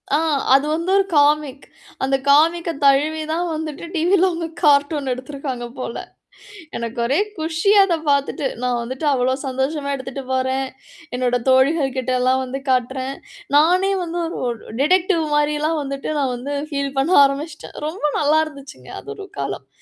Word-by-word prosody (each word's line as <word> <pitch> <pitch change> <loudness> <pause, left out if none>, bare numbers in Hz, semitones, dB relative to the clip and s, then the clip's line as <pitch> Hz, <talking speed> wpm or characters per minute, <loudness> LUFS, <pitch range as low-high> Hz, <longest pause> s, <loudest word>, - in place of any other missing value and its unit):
ஆ, - - +4 0.4
அது 275 +2 +5
வந்து 335 +3 -3
ஒரு 395 - +3
காமிக். 290 -1 +2 0.4
அந்த 270 0 +2
காமிக்க 330 +4 +4 0.2
தழுவிதான் 310 +4 +2
வந்துட்டு 310 0 -5
டிவில 355 +3 +3
அவங்க 335 -1 -3 0.2
கார்ட்டூன 285 -2 +3
எடுத்துருக்காங்க 260 -1 -6
போல. 235 -2 -4 0.8
எனக்கு 235 0 -5
ஒரே 275 +8 +2 0.2
குஷி 320 +4 0
அத 365 -3 +1
பாத்துட்டு. 280 0 0 0.2
நான் 250 -1 0
வந்துட்டு 260 +5 -5
அவ்ளோ 255 0 +1
சந்தோஷமா 275 +3 -2
எடுத்துட்டு 265 0 -6
போறேன், 260 +1 0 0.5
என்னோட 250 0 +1
தோழிகள் 270 +1 +3
கிட்டலாம் 255 0 +1
வந்து 260 +1 -5
காட்டுறேன், 260 +1 0 0.4
நானே 360 +6 +4
வந்து 345 0 -4
ஒரு 330 - -5
ஒரு 235 -2 -3 0.2
டிடெக்டிவ் 360 +2 +3
மாரிலாம் 300 +2 +1
வந்துட்டு 275 +1 -4
நான் 265 -3 0
வந்து 265 +4 -5 0.2
ஃபீல் 280 -1 -2
பண்ண 300 +7 +1
ஆரம்பிச்சிட்டேன். 295 +3 -5
ரொம்ப 315 +1 -4
நல்லா 300 +1 +3
இருந்துச்சுங்க, 280 -2 -12
அது 425 - -9
ஒரு 400 -2 -9
காலம். - - -4
280 Hz, 145 wpm, -20 LUFS, 260-315 Hz, 0.8 s, அது